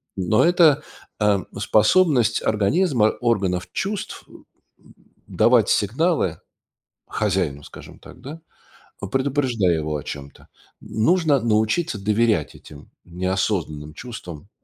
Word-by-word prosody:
Но 95 +3 +2
это, 165 -4 +4 0.4
э, 105 -2 +3 0.2
способность 120 - +3
организма, 110 - +2
органов 100 -7 0
чувств 200 +2 -4 1.0
давать - - +3
сигналы - - 0 0.7
хозяину, 90 -9 -1
скажем - - -13
так, - - -15
да, 145 +5 -9 0.7
предупреждая 130 -9 +1
его 75 -1 -3
о 75 - -7
чем-то. 70 -1 -9 0.3
Нужно 155 +4 +1
научиться 110 +5 0
доверять 110 +1 +1
этим 75 -1 -14 0.2
неосознанным 90 -4 -3
чувствам, 95 - -9
110 Hz, 95 wpm, -22 LUFS, 90-135 Hz, 1.0 s, это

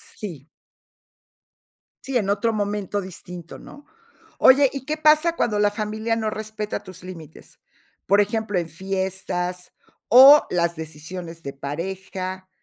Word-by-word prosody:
Sí. 165 -8 -8 1.6
Sí, 270 -2 -1
en 200 -4 -1
otro 225 +3 +1
momento 205 -1 -2
distinto, 180 -2 -10
¿no? 290 0 -14 0.5
Oye, 270 +1 +6
¿y 275 -2 -7
qué 310 - -1
pasa 310 +2 +4
cuando 210 -8 0
la 205 0 +4
familia 215 +2 -2
no 220 -1 -1
respeta 215 0 -5
tus 185 0 -12
límites? 170 -5 -12 0.5
Por 200 +2 +4
ejemplo, 210 -1 -1
en 170 -2 -2
fiestas, 185 0 -4 0.3
o 270 +5 +9
las 170 -1 0
decisiones 165 +2 -8
de 140 - -6
pareja, 185 +6 -6
195 Hz, 130 wpm, -23 LUFS, 180-220 Hz, 1.6 s, o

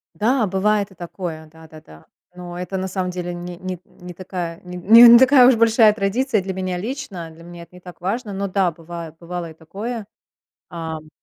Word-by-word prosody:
Да, 235 +2 +1
бывает 200 +1 0
и - - -17
такое, 165 -2 -7
да-да-да. 155 - -16 0.3
Но 175 -1 -8
это 180 +2 -4
на 190 0 -3
самом 185 -1 -3
деле 175 -1 -5
ни 175 0 -7
нит 185 -1 -6
не 180 -1 -12
такая 175 -2 -6
нин 180 0 -8
н 230 +3 +10
не - - +10
такая 260 -1 +7
уж 260 - +6
большая 225 -1 +5
и - - -7
традиция 225 +2 0
для 190 0 -5
меня 185 -1 -3
лично. 205 - -6
Для 165 +1 -15
меня 175 0 -11
это 180 - -19
не 180 - -14
так 180 0 -12
важно. 205 +3 -3
Но 200 +1 -3
да, 185 -2 +1
бывает, 165 0 -9
бывало 170 -1 -6
и - - -13
такое, 205 +8 -7 0.7
ам. 160 -2 -6
180 Hz, 205 wpm, -21 LUFS, 170-210 Hz, 0.7 s, н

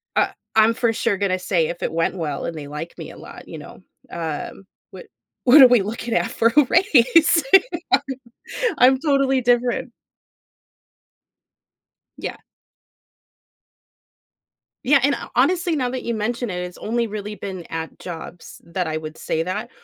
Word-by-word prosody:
Uh - - +2 0.2
I'm 220 +1 +5
for 230 0 0
sure 220 -2 0
gonna 185 -1 0
say, 175 -3 0
if 170 - -6
it - - -1
went 165 +2 0
well 150 -5 -3
and 165 - -5
they 145 -2 -7
liked 150 +3 -7
me - - -8
a - - -14
lot, - - -12
you - - -8
know, - - -12 0.3
um, 165 +3 -6 0.2
"What - - -11 0.4
what 270 +4 +8
are 260 - +11
we 245 -3 +4
looking 230 +3 -4
at 230 - 0
for 230 -2 +2
a 295 - +7
raise?" 325 - +4 1.4
I'm 260 +1 +5
totally 275 -3 +2
different. 245 +1 +1 2.3
Yeah. - - -5 2.5
Yeah, 275 +2 +4
and 285 +2 +3
ho - - -7
honestly, 345 +5 +2
now 255 -3 -1
that 255 0 -4
you 235 - -2
mentioned 235 +2 -3
it, 180 -1 -4
it's 180 0 -9
only 235 +2 -1
really 210 -1 -6
been 190 -4 -7
at 160 0 -6
jobs 175 0 -9
that 175 +1 -3
I 155 0 -3
would 155 0 -7
say 160 - -2
that, 205 +7 -4
225 Hz, 155 wpm, -21 LUFS, 175-255 Hz, 2.5 s, are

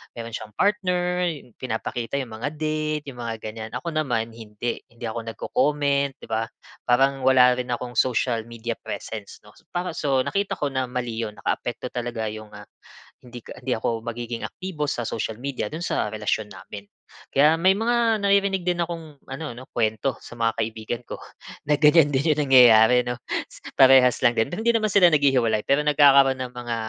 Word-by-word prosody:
meron 115 0 -7
siyang 105 -2 -8
partner, 180 - +1
yung 145 -7 -6
pinapakita 120 +1 -4
yung 120 -4 -8
mga 145 +5 -3
date, 155 0 -2
yung 125 - -13
mga 115 -1 -3
ganyan, 110 0 -6
ako 145 +7 -4
naman 120 -8 -1
hindi, 110 +1 -5
hindi 120 0 -16
ako 115 +1 -5
nagco-comment, 140 +3 0
'di - - -9
ba? 115 +1 0 0.4
Parang 135 +3 +3
wala 125 -1 +6
rin 125 0 -3
akong 120 0 -4
social 120 -2 +1
media 115 0 -5
presence 105 -3 -7
'no? 105 - -17 0.2
Para 180 +1 -1
so, 135 -3 +1
nakita 200 0 -1
ko 145 -2 -1
na 130 -1 -1
mali 125 -2 -4
yun. 105 -2 -5
Nakaapekto 120 +1 -3
talaga 120 -2 -3
yung 110 0 -9
ah, 105 0 -11 0.6
hindi 120 -1 -11
ka - - -10
hindi 130 0 0
ako 115 +1 -2
magiging 120 0 -5
aktibo 170 -6 -5
sa 120 -4 -2
social 110 -1 -3
media 135 0 -3
dun 165 +3 -5
sa - - -1
relasyon 105 0 -2
namin. 100 +1 -10 0.5
Kaya 150 +3 +5
may 190 +2 +5
mga, 225 0 +1
naririnig 200 -2 +2
din 175 -1 +1
akong 165 -4 -8
ano 150 +4 -6
'no, 130 +2 -10
kuwento, 110 +3 0
sa - - -11
mga 115 -1 +2
kaibigan 110 +1 -4
ko, - - -7 0.5
na 150 - +5
ganyan 150 0 +6
din 140 +4 +2
yung 150 - 0
nangyayari, 125 -1 +7
'no? 120 0 -3 0.6
Parehas 130 -2 +6
lang 120 -1 +4
din. 110 - +2
Pero 215 - -3
hindi 235 - +4
naman 215 -2 +1
sila 180 -3 +7
naghihiwalay, 125 -7 +2
pero 140 +2 +3
nagkakaroon 140 -3 +5
ng 125 - -19
mga 120 -1 -4
125 Hz, 185 wpm, -24 LUFS, 115-150 Hz, 0.6 s, nangyayari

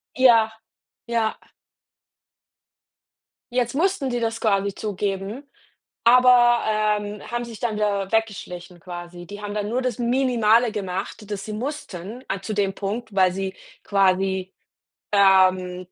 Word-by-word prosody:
Ja, 230 -4 +5 0.6
ja. 230 -2 0 2.1
Jetzt 245 -1 0
mussten 325 -3 0
die 245 - -1
das 225 -1 -2
quasi 200 -2 +1
zugeben, 205 +5 -4 0.5
aber, 240 0 +6
ähm, 210 -1 0
haben 240 0 -2
sich 230 -3 -10
dann 230 -3 -1
wieder 200 -2 -1
weggeschlichen 180 -5 -3
quasi. 175 0 -9
Die 205 +2 -9
haben 205 0 -5
dann 210 0 -2
nur 250 +3 0
das 250 -4 -2
Minimale 240 -2 +3
gemacht, 200 +1 -5
das 195 -1 -4
sie 215 - -5
mussten 235 - -6
a 195 0 -3
zu 215 - -4
dem 200 -2 0
Punkt, 215 +2 -4
weil 185 -1 +4
sie 190 0 -4 0.3
quasi, 190 -1 +1 0.6
ähm 185 -2 +4
210 Hz, 130 wpm, -23 LUFS, 195-235 Hz, 2.1 s, aber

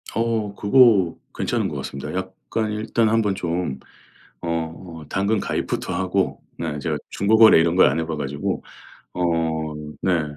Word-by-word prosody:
어 110 -3 -1
그거 105 -6 +5 0.2
괜찮은 - - 0
것 - - -6
같습니다. 70 - -6
약간 110 -1 -3
일단 110 +1 +1
한번 110 -3 +2
좀 85 -6 -2 0.6
어 80 0 -4
당근 100 +1 0
가입부터 - - -2
하고 95 +1 -1 0.2
네 75 -3 -3
제가 - - -2
중고 100 +3 +2
거래 110 -7 +8
이런 85 +1 +2
걸 95 - +7
안 75 +5 -1
해 80 - -1
봐 80 -1 -3
가지고. 70 0 -3 0.5
어 - - -6 0.8
네. 90 -4 +2
95 Hz, 260 characters per minute, -22 LUFS, 80-110 Hz, 0.8 s, 거래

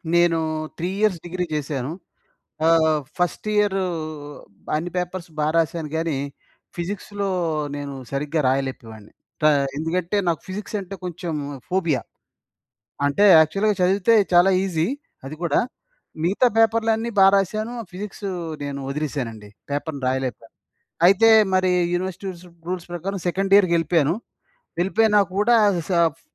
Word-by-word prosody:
నేను, 175 -1 +4 0.4
3 175 - -2
years 210 -5 +2
degree 180 +1 -2
చేశాను. 140 -2 -3 0.7
ఆహ్, 160 -2 +4 0.2
ఫస్ట్ 180 +4 -1
ఇయరు 200 -2 +2 0.9
అన్ని 170 +3 -2
పేపర్స్ 180 0 -3
బా 150 - +1
రాసాను 165 -2 0
గానీ, 160 -3 -1 0.6
ఫిజిక్స్‌లో 200 +3 -4 0.5
నేను 145 -1 -5 0.2
సరిగ్గా 150 +3 -1
రాయలేపోయేవాడిని. 130 -5 -4 0.3
టా 155 - +6 0.3
ఎందుకంటే, 170 +4 -1
నాకు 165 -3 0
ఫిజిక్స్ 205 +3 -5
అంటే 195 +1 -8
కొంచెం 175 -1 -4 0.4
ఫోబియా. 165 -9 0 1.1
అంటే, 145 +9 +3
యాక్చువల్‌గా 195 +7 +2
చదివితే 195 +5 +3 0.2
చాలా 175 +2 +6
ఈజీ 170 -3 0 0.4
అది 155 +2 -8
కూడా. 160 -4 +2 0.7
మిగతా 200 +8 +3
పేపర్‌లన్నీ 225 +1 +2
బా 195 - +8
రాసాను. 215 +5 -2 0.2
ఫిజిక్సు 195 +1 -6 0.3
నేను 140 -1 -4
ఒదిలేసానండి. 125 -8 -4 0.2
పేపర్ 145 0 -3
రాయలేకపోయాను. 130 -3 -3 0.5
అయితే, 200 +4 +6 0.3
మరి 185 -1 +3 0.2
యూనివర్సిటీ 185 +2 -3
రుసు 175 +1 -14 0.2
రూల్స్ 180 -1 -4
ప్రకారం 195 +3 -4
సెకండ్ 195 +2 0
ఇయర్‌కెళ్ళిపోయాను. 170 -4 +2 0.7
వెళ్ళిపోయినా 210 +3 +3 0.2
కూడా, 235 +3 +4 0.3
సఫ్ 170 -4 +2
175 Hz, 115 wpm, -22 LUFS, 155-195 Hz, 1.1 s, బా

